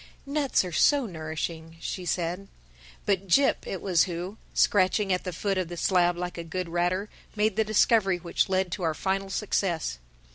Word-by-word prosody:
"Nuts 280 Hz, -7 st, +1 dB
are 180 Hz, -, -5 dB
so 280 Hz, -, +4 dB
nourishing," 160 Hz, -2 st, -5 dB
she 180 Hz, +2 st, -5 dB
said. 175 Hz, +3 st, -2 dB, 0.6 s
But 195 Hz, -1 st, 0 dB
Jip 275 Hz, +10 st, +3 dB
it 190 Hz, -, -5 dB
was 180 Hz, -5 st, +3 dB
who, 180 Hz, +4 st, -5 dB
scratching 195 Hz, 0 st, +3 dB
at 180 Hz, -, -2 dB
the 180 Hz, -, -2 dB
foot 195 Hz, +3 st, -1 dB
of 185 Hz, -, -2 dB
the 175 Hz, +1 st, -7 dB
slab 175 Hz, -1 st, +2 dB
like 180 Hz, 0 st, -4 dB
a -, -, -4 dB
good 175 Hz, +1 st, -4 dB
ratter, 175 Hz, +4 st, 0 dB, 0.3 s
made 215 Hz, +1 st, +1 dB
the 220 Hz, -, +3 dB
discovery 215 Hz, -2 st, +3 dB
which 175 Hz, +2 st, -1 dB
led 185 Hz, -1 st, +1 dB
to 190 Hz, -, -4 dB
our 160 Hz, -3 st, 0 dB
final 195 Hz, +2 st, -1 dB
success. 175 Hz, -, -1 dB
185 Hz, 180 wpm, -27 LUFS, 170-200 Hz, 0.6 s, so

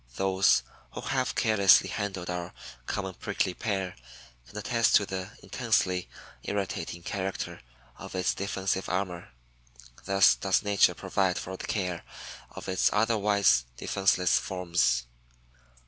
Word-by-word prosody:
Those 95 Hz, 0 st, +3 dB, 0.3 s
who -, -, -6 dB
have 130 Hz, -1 st, -1 dB
carelessly 110 Hz, -4 st, +5 dB
handled 95 Hz, -4 st, -4 dB
our 90 Hz, -1 st, -4 dB, 0.3 s
common 95 Hz, -2 st, -3 dB
Prickly 90 Hz, -, -2 dB
Pear 95 Hz, -3 st, -3 dB, 0.5 s
can 70 Hz, -, -11 dB
attest 115 Hz, +2 st, +2 dB
to 105 Hz, -, +5 dB
the 95 Hz, -1 st, -5 dB
intensely 90 Hz, -1 st, 0 dB, 0.3 s
irritating 95 Hz, -4 st, -4 dB
character 95 Hz, 0 st, -4 dB, 0.4 s
of -, -, -9 dB
its 90 Hz, -1 st, +1 dB
defensive 95 Hz, -1 st, -2 dB
armor. 90 Hz, -2 st, -3 dB, 0.8 s
Thus 95 Hz, 0 st, +5 dB
does 95 Hz, -1 st, +1 dB
nature 100 Hz, -1 st, +3 dB
provide 95 Hz, -2 st, 0 dB
for 95 Hz, -, -5 dB
the -, -, -7 dB
care 90 Hz, -5 st, -2 dB, 0.5 s
of -, -, -10 dB
its 95 Hz, 0 st, +2 dB
otherwise 105 Hz, -, +3 dB
defenseless 95 Hz, -2 st, +2 dB
forms. 85 Hz, -10 st, 0 dB
95 Hz, 120 wpm, -28 LUFS, 90-100 Hz, 0.8 s, carelessly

